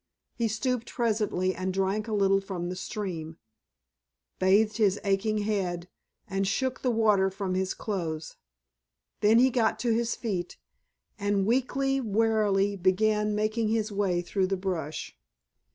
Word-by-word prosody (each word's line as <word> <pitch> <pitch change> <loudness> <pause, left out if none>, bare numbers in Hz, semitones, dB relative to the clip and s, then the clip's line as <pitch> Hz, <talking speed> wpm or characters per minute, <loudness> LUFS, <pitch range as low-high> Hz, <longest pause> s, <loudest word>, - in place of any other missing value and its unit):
He 230 - 0
stooped 240 +2 -2
presently 210 -6 0
and 185 0 -3
drank 195 +3 -1
a 220 - -3
little 195 -1 +3
from 180 -3 -4
the 180 - -4
stream, 180 -5 -5 1.0
bathed 210 +3 +3
his 205 -3 +2
aching 200 +2 +1
head, 180 -4 -2 0.4
and 195 0 -1
shook 260 +6 -1
the 255 - +1
water 210 -4 +3
from 190 -1 -3
his 185 0 -1
clothes. 165 -7 -4 0.8
Then 215 +2 +5
he 260 +2 +5
got 230 -3 +2
to 235 -2 +2
his 230 0 0
feet, 185 -7 -4 0.6
and 200 -1 +1
weakly, 270 +3 +1
warily, 210 -3 +2
began 210 +3 +2
making 215 +1 0
his 220 0 0
way 190 -4 0
through 190 +1 0
the 195 0 -1
brush. 175 - -4
205 Hz, 140 wpm, -28 LUFS, 190-220 Hz, 1.0 s, Then